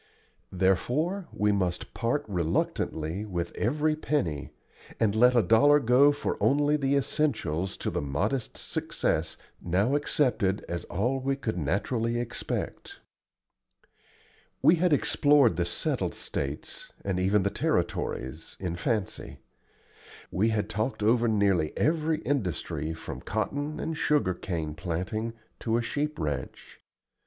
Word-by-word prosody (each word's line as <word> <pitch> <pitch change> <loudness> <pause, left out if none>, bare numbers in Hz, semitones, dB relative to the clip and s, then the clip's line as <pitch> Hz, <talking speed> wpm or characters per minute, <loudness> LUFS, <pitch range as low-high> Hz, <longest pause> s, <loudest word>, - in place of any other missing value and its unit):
Therefore 130 - +1
we 105 0 +1
must 90 -3 -1
part 125 +5 -1
reluctantly 85 -1 -1
with 90 -5 -3
every 150 +6 +1
penny, 95 - -1 0.5
and 105 -3 +2
let 125 +3 +5
a 120 - +5
dollar 145 +7 +6
go 130 +3 +5
for 145 - -2
only 145 +2 +3
the 140 -1 +1
essentials 125 - 0
to - - -2
the - - -1
modest 75 - -2
success - - -1 0.2
now 95 +9 +1
accepted 125 -9 +1
as 85 0 -4
all 125 +9 -1
we 135 +1 0
could 120 -5 -3
naturally 110 - 0
expect. 120 - -4 1.6
We 170 - +6
had 180 +1 +2
explored 145 - +4
the 85 +1 0
settled 85 - -1
States, 70 +2 -4
and 95 -2 0
even 95 +2 +3
the 100 - 0
Territories, 65 +6 -2
in 85 -2 -3
fancy; 105 +1 -2 0.9
we 105 +5 +2
had 105 -2 0
talked 110 +2 -2
over 115 +2 +3
nearly 100 -7 +2
every 155 0 +1
industry 85 - -2
from 80 0 -7
cotton 145 +8 -2
and 160 - -3
sugarcane 90 - 0
planting 90 +7 -3 0.3
to 115 0 0
a 120 - 0
sheep 150 +5 -2
ranch. 75 -6 -5
110 Hz, 125 wpm, -28 LUFS, 90-140 Hz, 1.6 s, dollar